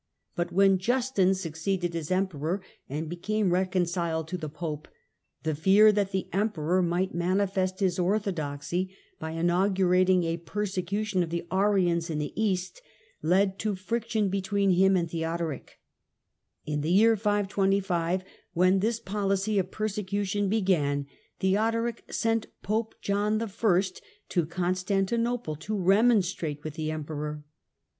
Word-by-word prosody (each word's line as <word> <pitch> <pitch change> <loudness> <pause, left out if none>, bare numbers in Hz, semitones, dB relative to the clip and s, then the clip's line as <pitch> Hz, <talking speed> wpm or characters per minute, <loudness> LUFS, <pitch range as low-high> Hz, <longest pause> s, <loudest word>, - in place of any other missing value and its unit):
But 175 0 -2
when 195 +1 +4
Justin 235 -3 +2
succeeded 175 0 -2
as 160 -3 -4
Emperor 185 -2 0 0.3
and 150 +4 -3
became 190 +3 0
reconciled 175 -3 0
to 180 - -2
the 155 -2 -5
Pope, 155 0 -5 0.6
the 160 0 0
fear 195 +8 +6
that 200 -2 0
the 190 -1 -2
Emperor 185 -4 +1
might 180 +2 0
manifest 185 +1 0
his 185 -2 +1
orthodoxy 180 -2 -1 0.2
by 160 0 -5
inaugurating 185 +1 +3
a 165 0 -1
persecution 195 +2 -2
of 170 - -1
the 170 0 -3
Arians 185 -4 +2
in 155 - -2
the 150 -1 -3
east 200 - -1 0.4
led 190 +3 +2
to 210 -1 -1
friction 220 +1 -1
between 200 0 +1
him 190 +1 +4
and 170 -2 -2
Theodoric, 165 -2 -3 0.9
In 150 -1 -2
the 155 - -2
year 220 +5 +5
525, 195 -4 +1 0.3
when 185 +2 +4
this 225 +3 0
policy 200 -1 0
of 185 -1 -1
persecution 205 -1 -2
began, 165 -9 +1 0.4
Theodoric 225 +4 0
sent 225 -1 0 0.2
Pope 220 +2 -1
John 205 +2 +1
I. 230 - -1 0.8
to 175 -4 +1
Constantinople 190 +4 -1
to 215 +7 -4
remon 205 +3 +4
strate 155 -5 -4
with 155 - -5
the 155 -1 -3
Emperor. 150 -1 -4
185 Hz, 130 wpm, -28 LUFS, 170-205 Hz, 0.9 s, fear